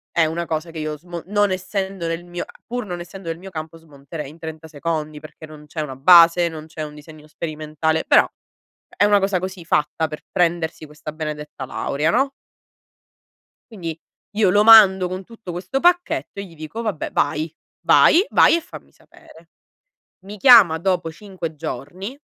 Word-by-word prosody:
è 170 - +4
una 165 +2 -3
cosa 165 +1 -4
che 160 - -7
io 155 0 -4
smo 170 +2 -8
non 205 0 +1
essendo 190 -1 -3
nel 165 +1 -3
mio 175 0 -6
a - - -18
pur 245 0 -4
non 175 -3 -6
essendo 180 +1 -10
nel 165 - -4
mio 190 +3 -10
campo, 160 -1 -7
smonterei 150 -1 -9
in 160 +3 -15
30 160 0 -8
secondi, 155 0 -4
perché 155 +1 -12
non 155 -1 -13
c'è 155 +1 -5
una 135 -3 -5
base, 170 +3 +7
non 160 -2 -8
c'è 160 -1 -7
un 150 -1 -8
disegno 150 0 -14
sperimentale, 155 0 -3
però - - +6 0.7
è - - +2
una 205 0 +4
cosa 195 -1 0
così, 185 -1 -7
fatta 150 +1 0
per 150 0 -8
prendersi 170 -2 0
questa 150 0 -9
benedetta 150 -3 -6
laurea, 145 +4 -1
no? 275 +6 +1 1.4
Quindi 170 -7 -6 0.4
io 210 -3 +3
lo 205 +3 +4
mando 195 -5 +8
con 185 +1 -5
tutto 220 -3 -10
questo 180 +9 -3
pacchetto 345 - +1
e - - -5
gli 170 -4 -15
dico: 155 +9 -7
“Vabbè, 210 -8 -3
vai, 150 +3 0 0.4
vai, 365 +6 +6
vai - - +5
e - - -2
fammi 335 - -13
sapere”. 165 +1 -20 0.8
Mi 205 +2 -9
chiama 205 -8 +7
dopo 175 -1 -1
5 175 -3 -7
giorni, 175 - -6
165 Hz, 180 wpm, -21 LUFS, 155-190 Hz, 1.4 s, mando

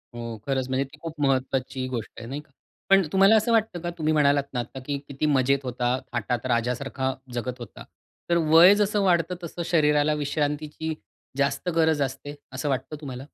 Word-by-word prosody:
हो, 115 -1 -5
खरंच 130 -2 0
म्हणजे 130 +1 +1
ती 135 - -16
खूप 165 -2 -7
महत्त्वाची 130 -1 0
गोष्ट 120 -4 -5
आहे, 115 - -8
नाही 140 +3 -5
का? 150 - -29 0.4
पण 195 0 +7
तुम्हाला 195 +3 +6
असं 220 +2 +2
वाटतं, 220 -5 +1
का 175 - -3
तुम्ही 155 0 +1
म्हणालात 145 -2 +3
ना 125 - -1
आता, 120 +3 -6
की 145 -1 -2
किती 140 +2 -3
मजेत 140 -1 +3
होता, 125 0 -1 0.2
थाटात 120 +1 -2
राजासारखा 130 +3 -1 0.2
जगत 125 +1 -4
होता. 120 - -10 0.5
तर 170 - +3
वय 175 +5 +8
जसं 210 0 +1
वाढतं, 175 -1 +2
तसं 170 +1 -6
शरीराला 150 -2 +3
विश्रांतीची 150 +2 -2 0.4
जास्त 140 +5 0
गरज 160 -3 +3
असते, 135 +2 -3 0.2
असं 140 +3 -3
वाटतं 135 +3 -2
तुम्हाला? 130 -1 -7
140 Hz, 180 wpm, -25 LUFS, 130-160 Hz, 0.5 s, वय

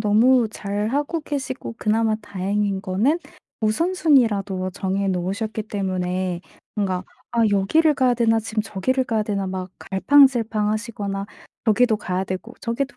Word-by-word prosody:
너무 225 +3 +4
잘 205 0 -3
하고 290 +6 -1
계시고 265 -5 -4
그나마 220 +1 +2
다행인 200 -1 -2
거는 210 - +1 0.4
우선순위라도 220 - +2
정해 195 +1 -1
놓으셨기 195 +5 -2
때문에 185 -3 -2 0.3
뭔가 190 -3 -1 0.3
'아 235 - 0
여기를 295 +11 +3
가야 255 -3 +3
되나? 225 -1 +3
지금 220 0 -2
저기를 255 +6 -1
가야 225 -3 0
되나?' 200 -2 -2
막 185 0 -4
갈팡질팡하시거나 215 -4 +2 0.4
여기도 225 +1 +4
가야 185 -3 -2
되고 190 +6 -6
저기도 265 +4 -3
215 Hz, 320 characters per minute, -22 LUFS, 195-245 Hz, 0.4 s, 너무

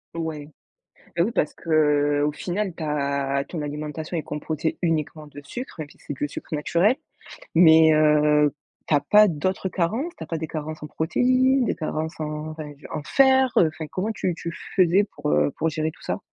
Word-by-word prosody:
Ouais. 160 -3 -4 0.7
Bah, 170 - +3
oui 225 - -1
parce 150 - 0
qu'au 150 -2 +2
final, 185 +4 -3
ta 140 -3 -1
ton 165 -4 -5
alimentation 150 +3 -5
est 155 - -2
composée 155 +1 -3
uniquement 155 -2 -1
de 145 0 -11
sucre, 250 - -7
même 150 -2 -5
si - - -19
c'est 145 - -6
que 140 - -6
le - - +1
sucre 155 - -6
naturel. 170 - +2 0.6
Mais, 160 -1 +7
heu, 150 -1 +4 0.3
tu - - 0
as 145 - +5
pas 210 0 +6
d'autres 185 +4 -2
carences? 225 - -1
Tu - - -8
as - - -10
pas 165 - -3
des 160 0 -4
carences 155 0 -6
en - - -5
protéines, 255 - +2
des - - -1
carences 160 0 -4
en 150 0 -4
enfin, 155 -2 -7 0.2
en 150 - -3
fer, 265 - +4
heu, 165 - +6
enfin, 155 -2 -6
comment 200 +7 -2
tu 180 -5 -2
tu 170 0 -5 0.2
faisais 185 +1 +4
pour, 150 -6 -5
heu, 145 - +3
pour 165 +1 +1
gérer 155 +1 -2
tout - - -21
ça? - - -2
155 Hz, 195 wpm, -24 LUFS, 150-180 Hz, 0.7 s, Mais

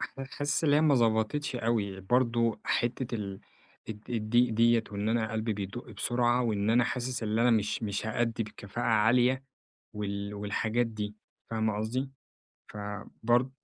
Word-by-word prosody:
ح - - -5
حاسس 145 +3 -2
اللي 145 -1 +5
هي 150 - +4
ما 155 -2 +5
ضبطتش 115 +3 +1
أوي، 105 -5 -1
برضو 115 0 +1
حتّة 120 +1 -1
ال 100 -3 -4 0.5
الض 110 +1 -8
الضيق 120 +1 +2
دِيَّة 115 0 +4
وإن 100 +2 -1
أنا 110 -1 0
قلبي 110 0 -1
بيدق 105 +4 -6
بسرعة 120 +3 +1
وإن 105 -2 +1
أنا 120 +1 +4
حاسس 125 -1 -2
اللي 110 +2 +1
أنا 125 - +5
مش 110 0 +1
مش 105 0 -2
هأدي 115 0 0
بكفاءة 105 +1 -6
عالية، 120 +4 +4 0.5
وال 100 -1 -4
والحاجات 110 +3 0
دي، 105 -2 -5 0.4
فاهمة 110 -2 0
قصدي؟ 125 +6 -2 0.6
فبرض 105 +4 -1
115 Hz, 150 wpm, -30 LUFS, 105-120 Hz, 0.6 s, اللي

